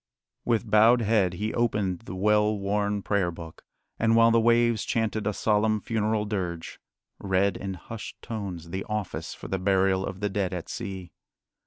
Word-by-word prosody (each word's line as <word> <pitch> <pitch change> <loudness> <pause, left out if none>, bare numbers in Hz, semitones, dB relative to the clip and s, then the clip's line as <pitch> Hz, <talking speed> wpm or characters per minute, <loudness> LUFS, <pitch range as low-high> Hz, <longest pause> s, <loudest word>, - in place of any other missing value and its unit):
With 115 -1 +1
bowed 110 +3 +5
head 105 -5 +2
he 105 +5 -3
opened 105 -6 0
the 95 - -6
well 105 +2 +2
worn 100 0 -1
Prayer 100 -4 +1
Book, 85 -1 -10 0.4
and, 115 0 +3
while 115 0 +6
the 115 - +4
waves 120 -1 +3
chanted 110 -2 -1
a - - +2
solemn 110 +1 +1
funeral 110 0 -1
dirge, 90 -5 -4 0.4
read 100 0 +1
in 95 -1 -5
hushed 110 +4 -9
tones 95 -7 -6
the 95 +1 -3
office 105 -3 -4
for - - -9
the 95 - -2
burial 95 0 +2
of 95 -1 -5
the 105 0 -1
dead 95 -2 -1
at 85 - -6
sea. 95 -6 -6
105 Hz, 170 wpm, -27 LUFS, 95-110 Hz, 0.4 s, while